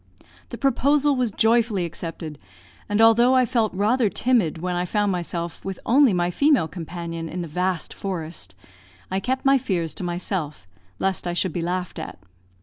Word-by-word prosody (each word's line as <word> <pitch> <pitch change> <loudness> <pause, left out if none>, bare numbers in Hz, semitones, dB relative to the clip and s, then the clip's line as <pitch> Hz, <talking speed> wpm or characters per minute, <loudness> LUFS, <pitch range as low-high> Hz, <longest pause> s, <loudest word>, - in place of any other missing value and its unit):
The - - -7
proposal 280 +2 +2
was 250 -2 +1
joyfully 220 -3 +2
accepted; 165 -2 -7 0.5
and 205 +1 +1
although 235 +3 +6
I 255 -1 +5
felt 230 -3 +1
rather 215 +4 +2
timid 220 -6 +1
when 180 +2 -2
I 175 - 0
found 205 +2 0
myself 170 -1 -4
with 195 -2 -5
only 270 0 +5
my 175 -1 +1
female 280 - +3
companion 165 0 -6
in 175 +2 -4
the - - -6
vast 180 +1 -2
forest, 160 - -5 0.6
I 190 - +1
kept 260 +7 -2
my 275 0 +5
fears 170 -8 -1
to - - -6
myself, 175 - -3 0.3
lest 190 - -1
I 175 - -1
should 175 -1 0
be 175 - -2
laughed 180 +1 -3
at. - - -7
185 Hz, 170 wpm, -23 LUFS, 170-235 Hz, 0.6 s, although